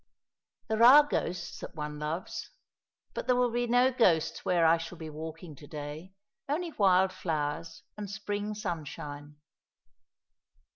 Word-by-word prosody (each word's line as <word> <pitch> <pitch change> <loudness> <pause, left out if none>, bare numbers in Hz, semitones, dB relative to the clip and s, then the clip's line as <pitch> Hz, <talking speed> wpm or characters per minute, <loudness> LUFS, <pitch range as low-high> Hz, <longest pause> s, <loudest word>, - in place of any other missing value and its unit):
"There 220 0 0
are 270 +5 +10
ghosts 175 - -3
that - - -9
one 150 -1 -5
loves. 155 +4 -4 0.6
But - - -5
there 250 - +4
will 245 -1 +2
be 240 +1 0
no 245 +2 +4
ghosts 170 -10 +2
where 175 -2 +3
I 165 +1 +6
shall 165 +2 -7
be 160 -1 -7
walking 160 +1 -8
to 145 - -13
day. 155 +5 -7 0.3
Only 330 +4 -1
wild 190 -5 +3
flowers 160 0 -3
and 205 -2 -6
spring 205 0 -3
sunshine." 150 -6 -6
175 Hz, 140 wpm, -30 LUFS, 155-215 Hz, 0.6 s, are